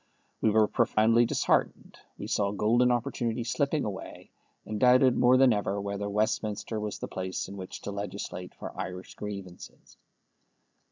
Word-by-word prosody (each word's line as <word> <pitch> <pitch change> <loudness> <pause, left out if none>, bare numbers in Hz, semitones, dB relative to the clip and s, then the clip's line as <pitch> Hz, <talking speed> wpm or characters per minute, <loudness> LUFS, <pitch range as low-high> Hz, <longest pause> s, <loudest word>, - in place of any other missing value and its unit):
We 110 - +4
were 110 0 +4
profoundly 115 +3 +3
disheartened. - - 0 0.2
We - - -6
saw 100 -1 0
golden 115 +5 +3
opportunities 120 -1 -1
slipping 145 0 0
away, 95 -2 -7 0.3
and 105 -1 -4
doubted 125 +1 +5
more 125 +1 +5
than 130 -2 +6
ever 100 -1 -1
whether 100 0 -3
Westminster 105 +1 -1
was 105 -1 -4
the - - -5
place 95 0 -4
in 100 - -8
which 95 -2 -8
to - - -5
legislate 100 -1 -6
for - - -8
Irish 90 0 -6
grievances. 100 -4 -9
105 Hz, 150 wpm, -28 LUFS, 100-120 Hz, 0.3 s, than